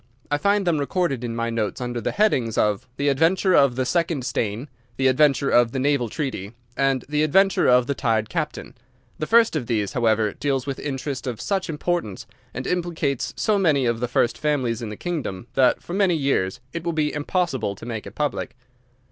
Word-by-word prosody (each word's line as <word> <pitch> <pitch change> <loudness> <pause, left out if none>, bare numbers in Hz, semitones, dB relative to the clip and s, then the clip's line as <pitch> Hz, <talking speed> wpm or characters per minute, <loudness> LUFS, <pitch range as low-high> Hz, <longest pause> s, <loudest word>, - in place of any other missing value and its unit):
I 145 - +1
find 200 +3 +2
them 165 -4 +2
recorded 140 -4 -1
in 115 -1 -3
my 115 0 -1
notes 110 -4 -2
under 120 -1 -3
the - - -1
headings 130 - +1
of 105 +4 +1
"The 140 - 0
Adventure 165 +7 +3
of 140 -6 +5
the 130 0 0
Second 165 -3 0
Stain," 120 0 -2 0.3
"The 135 - 0
Adventure 140 +1 +3
of 120 -1 +4
the - - -2
Naval 135 -3 +1
Treaty," 120 - -4 0.2
and 135 -2 +1
"The 150 +1 0
Adventure 190 +6 +3
of 125 0 +5
the 140 - -1
Tired 110 -4 0
Captain." 155 0 -4 0.5
The 155 - -2
first 230 -4 +4
of 130 -7 -2
these, 105 -4 -1
however, 110 -3 +2
deals 135 -3 -1
with 140 -2 -4
interest 135 -1 -4
of 120 -3 -4
such 190 -3 -2
importance 155 - -2 0.3
and 125 +2 -6
implicates 165 -7 -2
so 215 -2 +2
many 150 -8 +3
of 115 -1 0
the 125 - -1
first 120 0 +1
families 130 -6 0
in 115 - -4
the 105 - -6
kingdom 150 - -4
that 130 -2 +3
for 175 - -7
many 190 -3 +3
years 135 -11 0
it 170 - -4
will 170 0 -1
be 150 -2 0
impossible 145 - -1
to 105 - -11
make 115 -3 -5
it - - -11
public. 145 -5 -2
135 Hz, 200 wpm, -23 LUFS, 120-160 Hz, 0.5 s, of